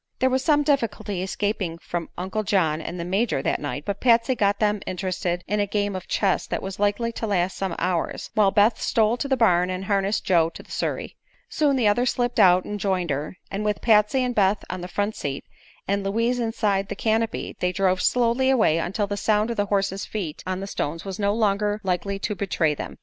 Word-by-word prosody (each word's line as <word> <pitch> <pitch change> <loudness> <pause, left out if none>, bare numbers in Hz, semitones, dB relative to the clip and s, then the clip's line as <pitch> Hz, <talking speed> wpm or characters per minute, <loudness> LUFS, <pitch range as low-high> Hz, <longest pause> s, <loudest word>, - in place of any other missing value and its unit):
There 260 +1 +2
was 260 +1 +1
some 295 -2 +3
difficulty 230 -9 -1
escaping 190 -3 -2
from 170 0 -5
Uncle 190 +4 -2
John 165 -7 +1
and 175 +2 -6
the 170 - -3
Major 190 - 0
that - - 0
night, 145 0 -4
but 200 0 -3
Patsy 235 0 +4
got 200 -4 +1
them 210 -1 +1
interested 180 -1 -2
in 210 +2 0
a 205 - +1
game 205 -1 -1
of 185 - -6
chess 195 -3 0
that - - -3
was 195 0 -6
likely 205 +3 +1
to 225 -1 -4
last 185 -2 0
some 190 -2 -3
hours, 180 -2 -2
while 210 -3 +4
Beth 210 +3 +3
stole 225 0 +2
to 280 - -3
the 265 -1 +1
barn 180 -6 +3
and 185 +1 -3
harnessed 200 +1 0
Joe 170 -3 +3
to - - -9
the - - -18
surrey. - - -3 0.3
Soon 295 -8 +2
the 245 -5 +2
others 240 +4 +3
slipped 245 0 -1
out 180 0 +6
and 210 0 -4
joined 185 -5 0
her, 145 +6 -3
and 200 +2 -2
with 210 -1 0
Patsy 220 +3 +4
and 250 -1 -1
Beth 200 -2 +2
on 185 0 -5
the 180 - -5
front 205 +3 -2
seat 140 -1 -4 0.4
and 200 0 0
Louise 230 +5 0
Inside 210 -4 0
the - - -3
canopy 225 +2 -1
they 180 - +1
drove 185 0 +1
slowly 250 +2 +2
away 220 -11 +3
until 195 +5 -1
the 205 0 -4
sound 215 +2 +1
of 235 - -4
the 205 0 +1
horse's 195 -1 0
feet 180 -8 -5
on 185 0 -2
the - - -4
stones 165 -3 -4
was 195 +1 -5
no 200 0 +2
longer 210 -1 +1
likely 190 +1 -1
to 210 +2 -2
betray 180 -6 0
them. - - -7
200 Hz, 220 wpm, -24 LUFS, 185-220 Hz, 0.4 s, out